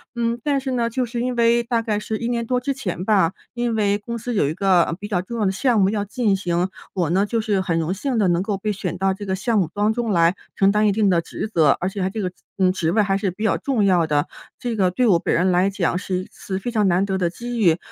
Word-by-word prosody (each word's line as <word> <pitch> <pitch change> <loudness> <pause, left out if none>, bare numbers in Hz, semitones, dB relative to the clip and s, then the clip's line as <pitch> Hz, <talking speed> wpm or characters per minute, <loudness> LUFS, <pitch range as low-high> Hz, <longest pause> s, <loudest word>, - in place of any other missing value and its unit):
嗯， 235 0 0
但 285 -2 +1
是 265 0 -4
呢， 235 -2 0
就 250 +2 -1
是 235 0 -4
因 250 0 -1
为 235 0 +3
大 235 -1 0
概 220 -2 -1
是 215 +1 -3
1 235 - -3
年 235 -1 -1
多 250 +2 0
之 275 +3 -2
前 185 -10 -4
吧， 195 -6 +3 0.2
因 240 -1 -1
为 205 -2 +2
公 235 +3 -6
司 240 +2 -4
有 145 -8 +2
一 - - -2
个， 185 -1 +3
呃， - - -3
比 205 - -6
较 190 -4 0
重 230 +6 -6
要 210 - +1
的 190 - +2
项 235 +3 +2
目 190 -1 +4
要 205 -1 -1
进 205 0 0
行。 180 -1 -1 0.2
我 175 -5 0
呢， 195 +3 +3
就 230 +2 -1
是 210 -3 0
很 170 -3 0
荣 165 +3 -1
幸 250 +5 -2
地 205 -4 +3
能 175 0 +1
够 200 0 -2
被 210 +2 -2
选 185 -3 -4
到 190 +1 +1
这 205 +2 -8
个 190 -1 -1
项 220 +4 0
目 180 -6 +1
当 205 +1 +1
中 235 -1 -2
来 170 -1 +3 0.2
承 195 0 +4
担 210 +1 +3
一 - - +4
定 205 0 +2
的 175 -2 +3
职 190 - -5
责， 155 -8 +4
而 180 - -1
且 195 0 -5
它 185 - 0
这 215 +3 -4
个， 185 -2 -2 0.3
嗯， 185 -1 +3
职 165 -3 -1
位 215 - +3
还 195 -1 +1
是 195 -2 -1
比 210 +5 -7
较 220 - +2
重 250 -7 0
要 180 -4 +3
的。 150 -2 0 0.3
这 240 -2 -3
个 190 -4 +2
对 245 +7 +1
我 180 -6 +4
本 - - -1
人 180 +2 +2
来 180 +2 +3
讲 185 -3 -1
是 185 -1 -2
一 - - -13
次 190 -1 -5
非 220 - -4
常 215 -3 +2
难 185 +2 +2
得 190 -1 -1
的 180 -2 0
机 240 +6 -6
遇。 170 -5 +4
200 Hz, 315 characters per minute, -22 LUFS, 185-230 Hz, 0.3 s, 目